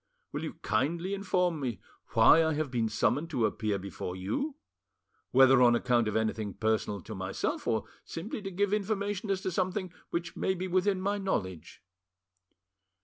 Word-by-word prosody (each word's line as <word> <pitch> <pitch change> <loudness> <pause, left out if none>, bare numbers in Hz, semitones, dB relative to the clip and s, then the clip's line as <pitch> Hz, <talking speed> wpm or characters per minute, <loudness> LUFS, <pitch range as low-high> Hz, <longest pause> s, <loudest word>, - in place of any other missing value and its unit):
Will - - -4
you - - -4
kindly 165 - 0
inform 180 -4 0
me 120 -8 -3 0.3
why 165 - +7
I 160 -1 +1
have 150 -3 -2
been 115 -3 0
summoned 145 +8 +1
to 125 -8 +1
appear 105 -1 -1
before 95 -1 -6
you, 110 - -2 0.7
whether 130 0 +6
on 120 -1 +6
account 120 -1 +2
of 105 - -2
anything 110 -2 -1
personal 110 -2 0
to - - -8
myself, - - -3
or - - +1 0.2
simply 200 +6 -5
to 195 - -4
give 200 +2 0
information 205 -1 -1
as 195 -1 0
to 185 - -2
something 185 0 -1 0.2
which 170 0 -3
may 190 - 0
be 185 +1 -3
within 185 +1 +2
my 200 +2 -1
knowledge?" 95 - -3
160 Hz, 165 wpm, -30 LUFS, -, 0.7 s, why